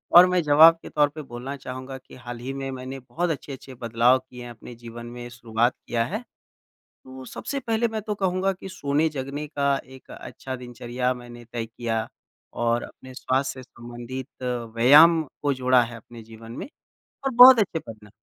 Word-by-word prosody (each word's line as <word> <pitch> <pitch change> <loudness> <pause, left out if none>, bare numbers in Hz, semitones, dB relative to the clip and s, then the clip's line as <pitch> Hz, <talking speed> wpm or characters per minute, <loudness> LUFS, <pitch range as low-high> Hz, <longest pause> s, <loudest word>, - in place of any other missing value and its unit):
और 175 +1 +11
मैं 180 -1 +2
जवाब 155 +3 +7
के - - -10
तौर 145 -1 +3
पे 155 +2 -8
बोलना 130 0 -7
चाहूँगा 130 +1 -7
कि 130 - -16
हाल 120 -1 -8
ही 130 +2 -5
में 135 0 -4
मैंने 130 +1 -7
बहुत 170 +7 -3
अच्छे-अच्छे 135 -3 -6
बदलाव 120 +1 +3
किए 125 -1 -12
हैं 120 - -8
अपने 120 +1 -11
जीवन 120 0 -10
में, 120 0 -8
शुरुआत 120 0 0
किया 115 -1 +1
है। 200 - -3 0.8
तो 130 0 -11
सबसे 280 - -5
पहले 235 -2 0
मैं 220 -1 -4
तो 210 0 -3
कहूँगा 190 0 0
कि 190 +1 -10
सोने-जगने 145 -2 -2
का 140 -2 +1
एक 130 0 -15
अच्छा 130 +2 -7
दिनचर्या 125 0 -3
मैंने 120 -1 -11
तय 115 -2 -2
किया 115 -1 -3 0.5
और 120 0 0
अपने 130 0 -12
स्वास्थ्य 130 0 -2
से 125 - -21
संबंधित 120 +2 -8 0.5
व्यायाम 150 +8 +7 0.2
को 145 -1 +1
जोड़ा 130 -1 +4
है 120 0 -7
अपने 115 +1 -13
जीवन 115 +1 -12
में। 120 - -6 0.6
और 270 - +1
बहुत 250 +1 +10
अच्छे 195 -6 +1
परिणा 110 -7 -12
130 Hz, 180 wpm, -25 LUFS, 120-150 Hz, 0.8 s, और